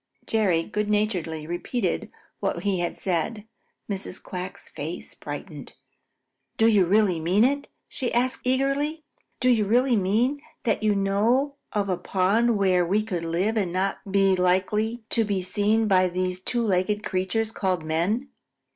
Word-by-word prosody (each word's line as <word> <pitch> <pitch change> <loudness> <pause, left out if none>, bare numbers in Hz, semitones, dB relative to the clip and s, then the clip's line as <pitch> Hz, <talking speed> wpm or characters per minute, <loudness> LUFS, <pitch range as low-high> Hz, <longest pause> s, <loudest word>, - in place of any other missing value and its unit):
Jerry 190 -7 +2
good 210 +2 -2
naturedly 180 -7 -1
repeated 175 +9 -2 0.3
what - - -2
he 200 -3 +1
had 175 - -2
said. 195 +4 -1 0.4
Mrs. 195 -2 -4
Quack's 180 0 -7
face - - -6
brightened. - - -8 0.8
"Do 225 - +4
you 205 -5 +4
really 195 -3 +3
mean 180 +7 +3
it?" 280 +3 +1 0.2
she 250 - -3
asked 255 +2 0
eagerly. 275 +4 0 0.4
"Do 255 - +1
you 235 -4 +4
really 245 +4 +3
mean 225 +9 +1 0.2
that 235 - 0
you 215 -1 +2
know 215 +8 +2 0.2
of 205 -1 0
a 185 -2 0
pond 210 +6 +2
where 185 -3 +3
we 200 +5 +1
could 185 -6 -3
live 180 +7 0
and 190 -5 0
not 190 +2 -1
be 195 -1 +4
likely 210 +6 +1
to 230 - +4
be 200 -3 -1
seen 210 +4 +1
by 185 -2 +4
these 180 0 -2
two 235 +5 0
legged 205 +2 +1
creatures 190 +4 -1
called 185 -6 -1
men?" 180 - -1
205 Hz, 155 wpm, -25 LUFS, 185-225 Hz, 0.8 s, Do